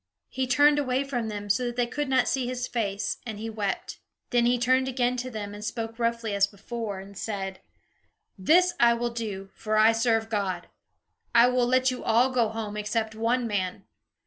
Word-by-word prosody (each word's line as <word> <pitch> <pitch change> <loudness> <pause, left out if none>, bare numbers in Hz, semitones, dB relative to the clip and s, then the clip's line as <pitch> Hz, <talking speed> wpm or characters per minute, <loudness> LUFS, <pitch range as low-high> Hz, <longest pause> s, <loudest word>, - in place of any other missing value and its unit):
He 260 -1 -2
turned 290 +3 +5
away 260 -1 0
from 245 -5 -3
them, 205 -1 -5
so 205 +5 +1
that 240 - -4
they 245 -1 +2
could 290 +3 -3
not 260 - +3
see 260 -2 0
his 250 0 -2
face, 205 -4 -2
and 220 -4 -6
he 225 +1 -5
wept. 205 -3 -3 0.3
Then 240 -1 +3
he 245 +1 +3
turned 255 +2 +2
again 250 -1 0
to 250 +1 -3
them 210 -3 -6
and 205 0 -8
spoke 225 +1 -4
roughly 230 -2 -1
as 200 0 +3
before, 205 0 -6
and 195 +1 -11
said: 195 -2 -4 0.8
"This 350 - +4
I 235 0 +5
will 240 0 -2
do, 205 -5 -5
for 215 -1 -2
I 215 +1 +7
serve 225 -1 +1
God. 195 -5 -2 0.7
I 235 0 +8
will 250 -1 +2
let 255 +1 +3
you 255 - -6
all 240 +4 +3
go 240 -3 +2
home, 220 -1 -5
except 220 +1 -1
one 235 +3 0
man. 195 -5 -2
230 Hz, 200 wpm, -27 LUFS, 210-250 Hz, 0.8 s, I